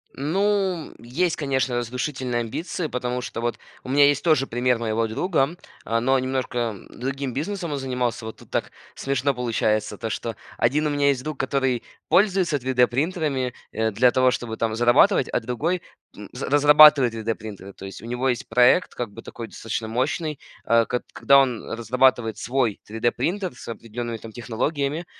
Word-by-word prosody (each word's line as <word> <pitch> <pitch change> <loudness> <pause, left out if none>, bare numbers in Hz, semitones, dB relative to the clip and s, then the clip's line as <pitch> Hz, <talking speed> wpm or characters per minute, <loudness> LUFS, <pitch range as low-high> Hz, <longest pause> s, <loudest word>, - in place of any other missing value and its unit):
Ну, 190 +3 0
есть, 150 +9 -1
конечно, 135 -3 -1
разрушительные 125 +1 -2
амбиции. 155 +8 -4
Потому 125 -2 -3
что 115 - -5
вот 120 -2 -1 0.3
у - - -9
меня 145 +2 +6
есть 145 -1 +2
тоже 155 -5 +3
пример 125 +1 +1
моего 115 0 0
друга, 155 - 0 0.3
э, 115 0 +1
но 130 +3 +2
немножко 125 -3 -2
другим 135 +1 -4
бизнесом 170 - -3
он 145 - -2
занимался. 125 -3 -2
Вот 110 - -7
тут - - -17
так - - -1 0.2
смешно 140 0 0
получается, 110 -4 0
то 115 - -4
что 115 0 -4 0.2
один 145 +6 +2
у - - 0
меня 145 0 +2
есть 135 -3 +1
друг, 155 -1 -5
который 135 -2 0 0.3
пользуется 185 -6 +3
3D-принтерами, 130 +2 0 0.2
э, 110 0 0
для 120 +4 +4
того, 130 0 +4
чтобы 120 -2 -3
там 110 -1 -1
зарабатывать, 120 - +4
а - - 0
другой, 145 +10 -2 0.3
м, - - -10
разрабатывает 145 -3 +7
3D-принтеры. 110 -3 -5
То 95 - -10
есть 95 - -9
у - - -8
него 125 +3 -1
есть 120 -2 -2
проект, 125 +9 +4
как 120 -3 -4
бы 115 - -10
такой, 115 - -8
достаточно 110 0 -5
мощный, 135 +6 -1 0.3
э 115 0 +4
к 125 - -2
когда 140 0 +5
он 125 -4 0
разрабатывает 115 -1 +2
свой 125 -4 0
3D-принтер 135 - -1
с - - -12
определенными 115 0 -5
там 110 0 -10
технологиями, 140 +8 -2
125 Hz, 165 wpm, -24 LUFS, 115-145 Hz, 0.3 s, разрабатывает